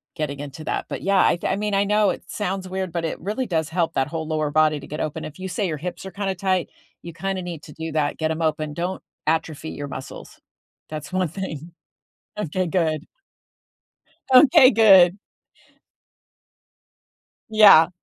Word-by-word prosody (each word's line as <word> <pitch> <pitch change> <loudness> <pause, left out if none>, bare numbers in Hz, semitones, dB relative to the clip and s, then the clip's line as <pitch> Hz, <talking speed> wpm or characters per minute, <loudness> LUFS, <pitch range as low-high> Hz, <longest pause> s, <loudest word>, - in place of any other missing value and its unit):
getting 150 -4 -4
into 145 +2 -8
that, - - -2
but - - -5
yeah, 195 0 +2
I - - +3
I - - +1
mean, 210 +1 -2
I 195 0 +3
know 210 0 +3
it - - -4
sounds 190 -2 -3
weird, 190 -1 -4
but 170 -1 -2
it 160 - -4
really 215 +7 -2
does 160 -3 -1
help 165 0 -1
that 135 - 0
whole 160 0 -4
lower 155 -2 -1
body 155 0 +3
to 140 - -11
get 150 - -6
open, 155 +1 -3
if 155 - -10
you 190 - -5
say 190 +2 -2
your 155 -3 -3
hips 180 +5 -6
are 190 - -7
kinda 195 0 -3
tight, 185 -1 0 0.3
you 170 - -9
kinda 190 +2 -3
need 170 -4 -7
to 150 - -12
do 160 +1 -6
that, 150 -2 0
get 160 0 -1
'em 160 +1 -3
open, 155 -1 -1
don't 175 +4 -3 0.3
atrophy 160 -1 -1
your 145 - -6
muscles. 135 -1 -9 0.5
That's 155 +2 -7
one 185 -1 +1
thing. 170 -3 -6 0.7
Okay, 185 -1 -2
good. 160 -2 -1 1.3
Okay, 255 0 +8
good. 195 -5 +6 2.3
Yeah. 200 -7 +7
170 Hz, 180 wpm, -23 LUFS, 155-190 Hz, 2.3 s, Okay